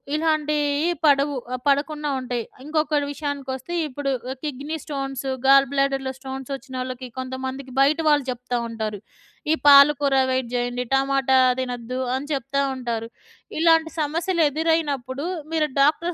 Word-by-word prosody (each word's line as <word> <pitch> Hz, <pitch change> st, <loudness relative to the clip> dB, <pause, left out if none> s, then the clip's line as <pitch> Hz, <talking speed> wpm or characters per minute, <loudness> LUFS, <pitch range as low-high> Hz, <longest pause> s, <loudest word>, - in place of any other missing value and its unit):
ఇలాంటియి 300 Hz, -1 st, +1 dB, 0.2 s
పడవు. 285 Hz, 0 st, +3 dB, 0.2 s
ఆహ్, 255 Hz, -, -3 dB
పడకుండా 295 Hz, +1 st, +1 dB
ఉంటాయి. 245 Hz, -2 st, -3 dB, 0.2 s
ఇంకొకటి 305 Hz, -1 st, 0 dB
విషయానికొస్తే 280 Hz, +1 st, -5 dB
ఇప్పుడు 275 Hz, 0 st, -3 dB, 0.3 s
కిడ్నీ 295 Hz, +2 st, -4 dB
స్టోన్స్, 270 Hz, -2 st, -4 dB, 0.2 s
గాల్ 275 Hz, 0 st, +7 dB
బ్లాడర్‌లో 270 Hz, -1 st, 0 dB
స్టోన్స్ 265 Hz, 0 st, -7 dB
ఒచ్చినోళ్ళకి 255 Hz, -1 st, -6 dB
కొంతమందికి 260 Hz, +1 st, -5 dB
బయట 285 Hz, +3 st, +4 dB
వాళ్ళు 295 Hz, -3 st, +3 dB
జెప్తా 245 Hz, 0 st, -3 dB
ఉంటారు. 220 Hz, -3 st, -4 dB, 0.5 s
ఈ -, -, +5 dB
పాల 280 Hz, 0 st, +10 dB
కూర 280 Hz, -1 st, +2 dB
అవాయిడ్ 260 Hz, -2 st, -1 dB
జేయండి, 245 Hz, 0 st, -1 dB
టమాటా 270 Hz, -1 st, +3 dB, 0.2 s
తినొద్దు 250 Hz, 0 st, -4 dB, 0.2 s
అని 270 Hz, +2 st, -4 dB
చెప్తా 275 Hz, +1 st, -1 dB
ఉంటారు. 235 Hz, -3 st, -3 dB, 0.5 s
ఇలాంటి 325 Hz, 0 st, +4 dB
సమస్యలెదురైనప్పుడు 310 Hz, -4 st, 0 dB, 0.3 s
మీరు 310 Hz, -2 st, +2 dB
డాక్టరు 325 Hz, +5 st, +2 dB
275 Hz, 125 wpm, -23 LUFS, 260-295 Hz, 0.5 s, పాల